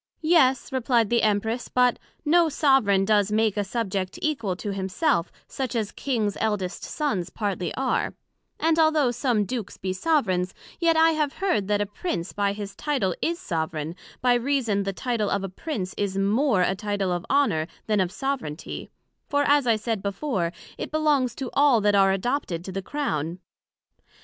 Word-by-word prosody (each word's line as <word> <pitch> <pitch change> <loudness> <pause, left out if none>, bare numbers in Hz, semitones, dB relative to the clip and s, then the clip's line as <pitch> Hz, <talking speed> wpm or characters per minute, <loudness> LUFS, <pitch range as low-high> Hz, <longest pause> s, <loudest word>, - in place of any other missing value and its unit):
Yes, 305 -6 +3
replied 240 -4 +1
the 235 - +3
Empress, 220 +3 0
but 250 -1 +2 0.3
no 335 +2 +4
soveraign 265 -10 +3
does 205 -1 +3
make 215 -1 +2
a 205 - 0
subject 195 -3 -3
equal 235 -12 -1
to 200 +2 -4
himself, 190 - 0 0.2
such 260 -3 -4
as 215 -3 -1
Kings 220 -7 -1
eldest 205 -4 -1
sons 200 - -2
partly 190 -4 -2
are: 265 0 0 0.4
And 325 +1 +2
although 310 -5 +4
some 240 -4 +1
Dukes 235 -2 -5
be 185 0 -3
soveraigns, 185 - +1 0.2
yet 335 -2 +3
I 325 0 +6
have 300 -3 0
heard 360 - 0
that 205 0 +1
a - - +1
Prince 200 - -4
by 200 -1 0
his 200 -1 -7
Title 245 - 0
is 335 +1 0
soveraign, 160 - -3 0.3
by 250 0 +4
reason 240 -4 +1
the 195 0 -1
Title 225 -1 -1
of 200 -1 0
a 195 - -3
Prince 190 - -4
is 195 -1 -1
more 210 +1 +2
a 180 - +2
Title 200 -1 -2
of 175 -1 -1
Honour, 215 - +2 0.2
then 210 -2 +1
of 185 -2 +2
soveraignty; 245 - -4 0.4
for, 285 0 +2
as 285 -2 +3
I 230 - +5
said 220 -1 -2
before, 200 - -1 0.3
it - - -4
belongs 290 -6 +1
to 265 -3 -5
all 280 -4 +5
that 205 0 +3
are 195 -1 +5
adopted 195 - -2
to 190 - -5
the 195 +1 -3
Crown. 175 - -2
215 Hz, 175 wpm, -25 LUFS, 195-275 Hz, 0.4 s, I